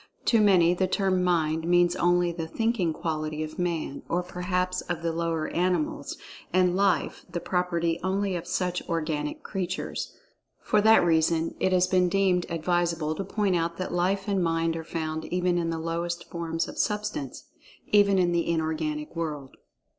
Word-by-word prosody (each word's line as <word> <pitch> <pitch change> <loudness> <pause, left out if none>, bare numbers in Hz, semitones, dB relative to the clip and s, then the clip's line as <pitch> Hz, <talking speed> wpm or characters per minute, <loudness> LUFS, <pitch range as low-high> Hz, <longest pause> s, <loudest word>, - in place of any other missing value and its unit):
To 230 -2 +4
many 180 -4 +5
the 185 +1 +1
term 190 -2 +1
"Mind" 160 -2 +1
means 175 0 +4
only 175 -1 +2
the 165 -1 -5
"thinking 225 -3 0
quality" 155 -1 -3
of 155 +2 -7
man, 170 -5 -2
or 180 +1 0
perhaps 180 0 -2
of 170 -1 -3
the 165 - 0
lower 165 -1 -1
animals; 185 - -1 0.3
and 180 -1 +3
"Life" 200 +1 +1
the 175 0 -3
property 170 -2 0
only 195 0 0
of 170 - -5
such 180 -1 -1
organic 155 -3 -2
creatures. 185 -2 -4 0.4
For 210 - +2
that 220 -3 +6
reason 165 0 +2
it 190 - +1
has 180 -1 +4
been 185 -1 +2
deemed 185 -1 +2
advisable 170 -1 0
to 175 - -4
point 195 -1 0
out 170 0 -1
that 185 - -4
Life 190 +3 0
and 195 -3 +1
Mind 165 0 +1
are 165 - -4
found 160 -1 -4
even 180 0 0
in 165 -1 -1
the 165 - -2
lowest 170 +1 -3
forms 165 -1 -2
of - - -8
substance—even 205 +1 -1
in 175 -2 +3
the 170 -1 0
inorganic 155 -1 -2
world. 150 -5 -4
175 Hz, 165 wpm, -27 LUFS, 165-185 Hz, 0.4 s, that